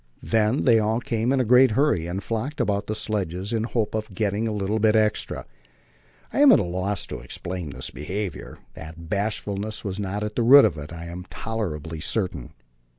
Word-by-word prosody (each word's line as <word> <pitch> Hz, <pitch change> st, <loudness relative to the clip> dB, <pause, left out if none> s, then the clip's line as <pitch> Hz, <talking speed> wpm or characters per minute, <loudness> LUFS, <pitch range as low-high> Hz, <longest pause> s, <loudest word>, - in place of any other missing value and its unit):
Then 110 Hz, +4 st, +1 dB
they 115 Hz, -4 st, +5 dB
all 110 Hz, +2 st, +1 dB
came 115 Hz, 0 st, -1 dB
in 135 Hz, -, +2 dB
a 130 Hz, -, +2 dB
great 125 Hz, +1 st, +5 dB
hurry 135 Hz, -, +2 dB
and 95 Hz, +3 st, -4 dB
flocked 115 Hz, +7 st, -3 dB
about 100 Hz, -3 st, 0 dB
the 110 Hz, -, -2 dB
sledges 100 Hz, -2 st, -2 dB
in 115 Hz, -, +1 dB
the 115 Hz, -, -2 dB
hope 115 Hz, -3 st, -1 dB
of 110 Hz, -3 st, -4 dB
getting 105 Hz, +2 st, 0 dB
a -, -, -1 dB
little 105 Hz, +1 st, -1 dB
extra 110 Hz, -1 st, +2 dB
bit. -, -, -28 dB, 0.9 s
I -, -, +2 dB
am 290 Hz, -2 st, +8 dB
at 220 Hz, -, +7 dB
a -, -, +1 dB
loss 95 Hz, +3 st, -1 dB
to -, -, -7 dB
explain 85 Hz, +7 st, -5 dB
this 65 Hz, -2 st, -4 dB
behaviour; 95 Hz, +4 st, -5 dB, 0.2 s
that 80 Hz, +1 st, -10 dB
bashfulness 105 Hz, 0 st, -2 dB
was 100 Hz, -2 st, -3 dB
not 100 Hz, +1 st, -3 dB
at 105 Hz, 0 st, -4 dB
the -, -, +1 dB
root 135 Hz, +4 st, +8 dB
of -, -, 0 dB
it, 75 Hz, 0 st, -8 dB
I 85 Hz, 0 st, -7 dB
am 90 Hz, +2 st, -8 dB
tolerably 80 Hz, -8 st, -4 dB
certain. 90 Hz, -, -1 dB
105 Hz, 205 wpm, -24 LUFS, 90-110 Hz, 0.9 s, am